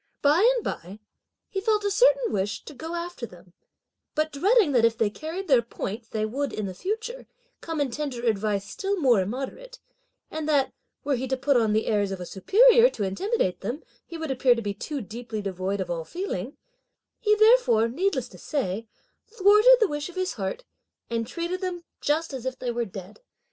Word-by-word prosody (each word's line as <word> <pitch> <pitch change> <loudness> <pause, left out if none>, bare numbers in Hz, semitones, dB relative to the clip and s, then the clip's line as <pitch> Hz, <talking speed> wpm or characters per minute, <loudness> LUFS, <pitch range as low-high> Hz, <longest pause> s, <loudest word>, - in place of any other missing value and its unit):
By 340 +12 +5
and 475 - -2
by 185 +4 -5 0.5
he 390 - -3
felt 425 0 +1
a 405 - 0
certain - - +4
wish 200 +1 -2
to - - -9
go 320 +5 -6
after 340 -8 -5
them, 175 -2 -17 0.6
but 310 0 0
dreading 390 - +3
that 245 -4 +3
if 230 -1 +3
they 215 -3 +1
carried 330 - -6
their 265 -5 +5
point, 225 -1 -6
they 215 -1 -1
would, 275 +6 -2
in 215 - -3
the 190 - -5
future, 445 - -4 0.3
come 325 -2 -4
and 275 -4 0
tender 265 -5 -4
advice 210 -2 0
still 395 0 -2
more 245 - +4
immoderate, 270 - -5 0.5
and 310 0 -3
that, 280 -3 +2 0.3
were 285 -1 +1
he 260 +2 -3
to 265 +1 -1
put 275 +2 +2
on 225 -3 +3
the 220 - +1
airs 205 -3 +1
of 190 - -4
a 180 - -5
superior 465 - +5
to 215 - -4
intimidate 195 - -1
them, 240 - -4 0.2
he 335 - -8
would 320 -3 -3
appear 255 -1 +4
to 230 - -3
be 205 -1 -2
too 280 +8 -5
deeply 225 +1 -6
devoid 195 0 -3
of 180 -2 -3
all 165 -1 -2
feeling, 365 - -5 0.6
he 425 -2 +3
therefore, 435 - +5
needless 290 +1 -1
to 180 - -14
say, 225 - -2 0.4
thwarted 425 +3 +6
the 440 - +4
wish 295 0 -4
of 355 - -13
his 370 -1 -1
heart, 200 - -4 0.5
and 230 -1 -1
treated 345 +2 -3
them 360 -2 -3 0.2
just 305 +1 0
as 260 -1 -4
if 260 - -3
they 245 - -3
were 235 0 -1
dead. 195 -1 -10
275 Hz, 200 wpm, -26 LUFS, -, 0.6 s, thwarted